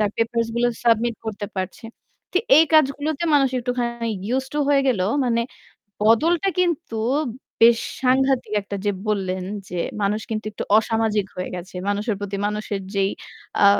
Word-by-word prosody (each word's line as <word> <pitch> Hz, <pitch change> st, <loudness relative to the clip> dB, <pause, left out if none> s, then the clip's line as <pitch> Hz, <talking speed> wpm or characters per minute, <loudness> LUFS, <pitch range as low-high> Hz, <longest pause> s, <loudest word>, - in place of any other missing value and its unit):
তার 210 Hz, -1 st, +2 dB
পেপারস 230 Hz, 0 st, 0 dB
গুলো 240 Hz, -, +3 dB, 0.2 s
সাবমিট 230 Hz, 0 st, +3 dB
করতে 205 Hz, -1 st, -4 dB
পারছে। 185 Hz, +4 st, -4 dB, 0.5 s
তো 370 Hz, -, +3 dB, 0.2 s
এই 320 Hz, -, +7 dB
কাজগুলোতে 300 Hz, +2 st, +2 dB
মানুষ 275 Hz, -2 st, +5 dB
একটুখানি 240 Hz, -1 st, -2 dB, 0.2 s
ইউস 260 Hz, +4 st, 0 dB
টু -, -, 0 dB
হয়ে 285 Hz, -1 st, +5 dB
গেলো। 200 Hz, -8 st, +2 dB, 0.2 s
মানে 235 Hz, -1 st, +1 dB, 0.6 s
বদলটা 320 Hz, -, +3 dB
কিন্তু 340 Hz, -9 st, -1 dB, 0.7 s
বেশ 230 Hz, 0 st, +7 dB, 0.2 s
সাংঘাতিক 265 Hz, -1 st, +2 dB
একটা 200 Hz, 0 st, -5 dB
যে 205 Hz, -, +4 dB, 0.2 s
বললেন 185 Hz, -3 st, -1 dB, 0.2 s
যে 180 Hz, -, -4 dB, 0.2 s
মানুষ 210 Hz, +2 st, +1 dB
কিন্তু 215 Hz, 0 st, -2 dB
একটু -, -, -5 dB
অসামাজিক 220 Hz, -3 st, 0 dB
হয়ে 180 Hz, -, -4 dB
গেছে। 180 Hz, +2 st, -9 dB
মানুষের 205 Hz, +2 st, 0 dB
প্রতি 200 Hz, 0 st, -3 dB
মানুষের 210 Hz, -1 st, -3 dB
যেই 195 Hz, 0 st, +2 dB, 0.5 s
আ -, -, +9 dB
230 Hz, 150 wpm, -22 LUFS, 205-260 Hz, 0.7 s, আ